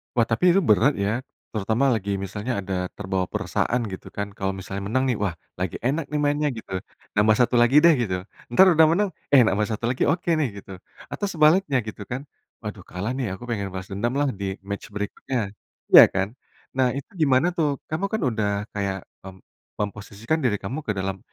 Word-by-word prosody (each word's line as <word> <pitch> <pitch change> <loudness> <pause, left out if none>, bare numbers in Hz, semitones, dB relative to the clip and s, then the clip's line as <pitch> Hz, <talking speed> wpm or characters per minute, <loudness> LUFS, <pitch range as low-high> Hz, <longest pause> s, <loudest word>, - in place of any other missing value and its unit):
Wah, 120 - +4
tapi 175 +10 +4
itu 195 - +4
berat, 125 +3 +4
ya. 100 +4 0 0.3
Terutama 110 +6 +1
lagi, 100 -4 -1
misalnya, 105 +5 -4
ada 90 -1 -2
terbawa 95 -2 -2
perasaan, 125 +5 -1
gitu, 95 - -8
kan. 100 0 -3
Kalau 95 -1 -3
misalnya 100 +1 -5
menang, 130 +5 +1
nih, 120 - -1
"Wah, 100 -4 -1 0.2
lagi 90 -2 -2
enak, 140 +5 0
nih, 150 - -2
mainnya, 145 +1 +1
gitu. 95 -4 -5 0.4
Nambah 110 +1 +5
1 125 - 0
lagi, 120 +3 +4
deh," 170 - +8
gitu. 105 -6 0 0.3
Entar 120 +11 +6
udah 160 -1 +6
menang, 200 +4 +2 0.2
"Eh, 135 -3 +6
nambah 105 -1 +1
1 115 +2 -1
lagi, 125 - 0
oke, 170 +3 +1
nih," 145 -5 +1
gitu. - - -13 0.4
Atau 205 - -2
sebaliknya, 155 - +3
gitu, 105 -2 -8
kan. 130 +3 -4 0.4
"Waduh, - - -6
kalah, 95 +6 -3
nih. 125 -7 -2
Aku 110 - -12
pengen 115 -5 -3
balas 95 +3 -7
dendam, 115 +6 -1
lah, 145 0 +2
di 95 -1 -2
match 100 +1 -6
berikutnya." 105 +1 -3 0.4
iya, - - +12
kan? 95 0 +1 0.5
Nah, 130 -1 +3
itu 140 - -8
gimana, 140 +1 +4
tuh? 155 -3 +2 0.2
Kamu 160 +5 -1
kan 220 - 0
udah 110 -3 -1 0.3
kayak 100 -2 -2 0.3
mem 95 -1 -9 0.4
memposisikan 105 +7 -3
diri 120 -5 +2
kamu 125 +10 -3
ke - - +2
dalam, 95 0 -2
110 Hz, 195 wpm, -24 LUFS, 100-140 Hz, 0.5 s, iya